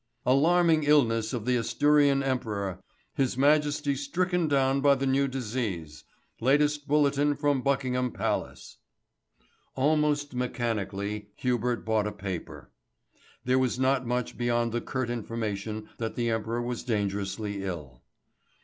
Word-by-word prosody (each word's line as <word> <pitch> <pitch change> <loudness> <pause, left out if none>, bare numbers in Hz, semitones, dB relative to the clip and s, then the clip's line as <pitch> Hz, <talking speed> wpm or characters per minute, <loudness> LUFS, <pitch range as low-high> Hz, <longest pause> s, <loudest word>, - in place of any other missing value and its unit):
"Alarming 160 +5 +4
illness 115 -7 +3
of 115 -4 -4
the 125 0 +2
Asturian 140 +4 +3
Emperor. 105 -8 -2 0.3
His 135 -4 0
Majesty 145 0 +2
stricken 175 +5 0
down 135 -1 +2
by 140 0 +5
the 135 0 -2
new 135 +1 +2
disease. 105 - -4 0.3
Latest 145 +3 +2
bulletin 145 0 +2
from 145 -2 +1
Buckingham 125 -2 0
Palace." - - -3 1.0
Almost 145 0 +1
mechanically 105 -4 -3
Hubert 125 -1 -1
bought 110 -1 +1
a - - -3
paper. 90 -8 -7 0.7
There 130 +1 +3
was 130 -2 0
not 130 -1 +1
much 125 0 -2
beyond 120 -1 +1
the 120 +1 -1
curt 130 -3 -3
information 110 -2 -4
that 115 -1 -3
the 120 -1 0
Emperor 115 +2 -2
was 120 -1 -3
dangerously 100 -2 -2
ill. 75 -10 -6
125 Hz, 125 wpm, -28 LUFS, 110-140 Hz, 1.0 s, by